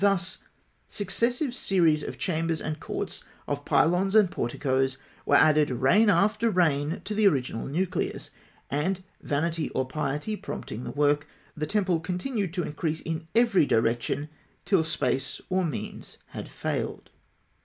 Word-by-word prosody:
Thus, 195 -3 +2 0.5
successive 240 - 0
series 170 -10 +3
of - - -6
chambers 165 -2 -1
and 155 0 -4
courts, - - -5 0.2
of - - -3
pylons 185 +5 +3
and 205 -5 +6
porticoes, 130 +2 0 0.3
were - - +5
added 155 -1 +5
reign 135 - +4
after 210 +4 +3
reign 160 -4 +1
to 215 - -2
the 210 0 +4
original 130 -9 0
nucleus; 175 +6 -2 0.4
and 180 +7 0 0.2
vanity 160 +2 -1
or 130 - +1
piety 150 +8 -2
prompting 125 - -6
the - - -4
work 145 +1 +2 0.3
the 155 0 -3
temple 190 -5 +1
continued 185 +4 -2
to 180 - 0
increase 155 +1 -2
in 160 0 -4
every 230 -10 +4
direction, 120 +5 +1 0.4
till 190 -5 +3
space 135 -4 -1
or 185 0 +2
means 155 -7 -5
had - - -7
failed. - - -4
165 Hz, 140 wpm, -27 LUFS, 145-195 Hz, 0.5 s, and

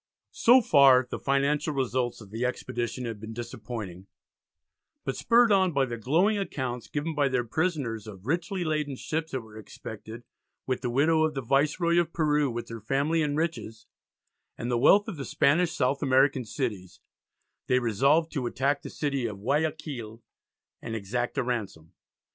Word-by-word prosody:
So 250 +3 +6
far 135 - +6
the - - -3
financial 140 +2 0
results 125 -2 -1
of 100 -2 -13
the 115 +3 -3
expedition 125 0 -3
had 115 -3 -5
been 110 +1 -8
disappointing, 110 -5 -7 1.0
but 135 - -2
spurred 235 -1 +4
on 190 -3 +3
by 135 -1 +2
the 120 -2 -5
glowing 175 - +2
accounts 130 - -4
given 155 +2 -3
by 145 -2 +2
their 125 -2 0
prisoners 120 - -2
of 100 -2 -11
richly 175 +5 -1
laden 150 -3 -1
ships 160 +4 -3
that 130 - -2
were 110 -1 -12
expected 110 +2 -9 0.4
with 130 -1 -2
the 125 - -2
"widow 155 +6 +3
of 155 -1 0
the 135 - -3
Viceroy 155 +7 +2
of 170 -1 -1
Peru 150 -3 +2
with 120 0 -5
her 115 -1 -7
family 140 +8 +1
and 150 -1 0
riches," 150 -9 -3 0.7
and 120 +1 -3
the 120 - +1
wealth 205 +11 +5
of 170 - -5
the 140 - -4
Spanish 165 +6 +2
South 135 -2 0
American 135 -1 +3
cities, 105 -7 -4 0.7
they 125 - +3
resolved 140 +8 +2
to 130 -6 -2
attack 140 +4 0
the - - -8
city 140 -5 -2
of 105 -3 -6
Guiaquil, 140 -6 -2 0.6
and 115 - -5
exact 120 +6 -3
a 135 - +2
ransom. 105 -10 -4
135 Hz, 170 wpm, -27 LUFS, 115-155 Hz, 1.0 s, So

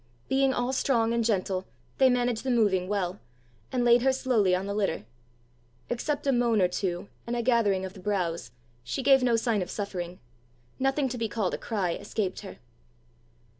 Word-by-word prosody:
Being 270 0 +3
all 250 0 -1
strong 230 -4 +2
and 235 0 +1
gentle, 190 -4 0 0.3
they 265 - +6
managed 245 -2 +1
the 265 - -2
moving 205 -7 +2
well, 195 -2 -2 0.5
and 245 -1 0
laid 240 0 +6
her 265 +1 +4
slowly 230 -8 +2
on 185 +1 -2
the 200 - -3
litter. 195 - -1 0.9
Except 285 +5 -2
a 275 - +3
moan 240 -3 +2
or 180 - +4
two, 180 +1 -3 0.2
and 240 - -1
a 235 - -1
gathering 215 -6 +2
of 190 - -7
the 195 - -12
brows, 180 -7 -2 0.3
she 260 - -3
gave 270 0 +6
no 245 -2 +3
sign 230 -3 +1
of 180 - -4
suffering; 180 -4 -4 0.6
nothing 270 +1 +1
to 245 -1 -5
be 225 -1 -1
called 205 -4 -1
a - - -1
cry 195 -7 -1
escaped 195 0 -3
her. 200 - -9
225 Hz, 185 wpm, -28 LUFS, 190-245 Hz, 0.9 s, they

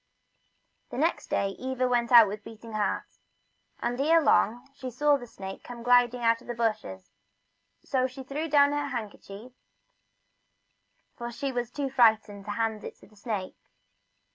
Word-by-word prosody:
The - - -7
next - - 0
day 195 - 0
Eva 255 0 -1
went 240 -1 0
out 235 -3 +9
with 205 +1 -6
beating 225 0 -11
heart, 210 -2 -1 0.7
and 245 +2 -2
ere 325 +3 +5
long 245 -4 +2
she 260 -2 -7
saw 290 +4 +3
the 245 -3 -6
snake 190 -3 -9
come 240 -1 -9
gliding 245 0 +4
out 230 0 +3
from - - -18
the 240 - -4
bushes, 215 - -3 0.7
so 255 -1 +1
she 260 +1 -10
threw 295 +5 -4
down 285 -1 +5
her 290 0 -1
handkerchief, 220 -2 -7 1.6
for 240 0 -6
she 275 +3 -3
was 245 -2 -3
too 275 +1 -4
frightened 220 -5 +3
to 210 - -4
hand 225 -1 -2
it - - -7
to - - -19
the 215 - -23
snake. 205 -3 -5
240 Hz, 165 wpm, -28 LUFS, 220-260 Hz, 1.6 s, out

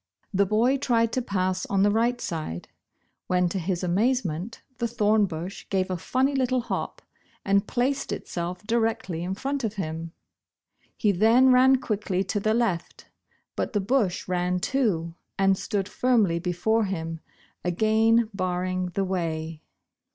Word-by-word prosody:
The 200 +1 +3
boy 235 +7 +3
tried 230 -4 +1
to 255 - +1
pass 185 -4 -1
on 195 -1 +2
the 205 - +4
right 235 +3 +1
side, 155 - -5 0.6
when 180 0 +2
to 190 - -2
his 180 +1 -2
amazement, 195 0 0 0.2
the 235 - 0
thorn 215 -2 +2
bush 175 +2 -7
gave 190 -1 0
a - - 0
funny 260 +10 0
little 255 -2 +1
hop 235 - -4 0.4
and 200 +1 +2
placed 270 +3 -1
itself 180 +2 -4
directly 225 -7 -1
in 185 +2 -3
front 275 +5 -3
of 220 -1 -2
him. 165 -3 -4 0.9
He 210 - +3
then 225 +7 +5
ran 260 +1 +6
quickly 205 -6 -1
to 205 +2 -2
the 215 +2 +1
left, 210 -8 -2 0.5
but - - -2
the 205 - +2
bush 205 -2 0
ran 180 0 0
too, 180 -9 0 0.2
and 195 0 +4
stood 195 0 -2
firmly 210 -7 +2
before 185 +6 +1
him, 165 -4 -4 0.4
again 220 +5 +3
barring 185 -1 -1
the 195 - +1
way. 165 -4 -3
200 Hz, 150 wpm, -26 LUFS, 180-230 Hz, 0.9 s, ran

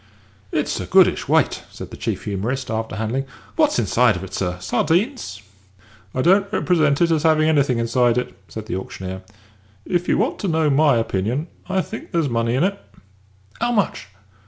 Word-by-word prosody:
"It's - - -1
a - - -5
goodish - - +4
weight," - - +2
said - - -9
the - - -7
chief - - -3
humorist, 110 +6 -3
after 110 -2 -3
handling 110 +5 -1
it. - - -23 0.3
"What's 305 -2 +3
inside 120 -3 +3
of 90 - -5
it, 95 0 -9
sir 90 -2 -2
sardines?" 160 - -1 0.7
"I 130 - +1
don't 195 +3 +4
represent 155 -5 +2
it 170 - +2
as 160 -2 +2
having 155 -1 +3
anything 140 -5 +3
inside 120 +1 +2
it," 125 - -2
said 110 -1 -7
the 110 -4 -3
auctioneer. 95 0 -6 0.6
"If 175 0 -1
you - - +3
want - - 0
to 200 - -2
know 160 -3 +2
my 145 -1 +4
opinion, 115 - -1 0.2
I 190 0 +2
think 225 - -8
there's 165 -6 0
money 115 0 0
in 130 - +2
it." 200 +1 0 0.8
"'Ow 240 +1 +1
much?" 200 - 0
135 Hz, 180 wpm, -21 LUFS, 110-170 Hz, 0.8 s, goodish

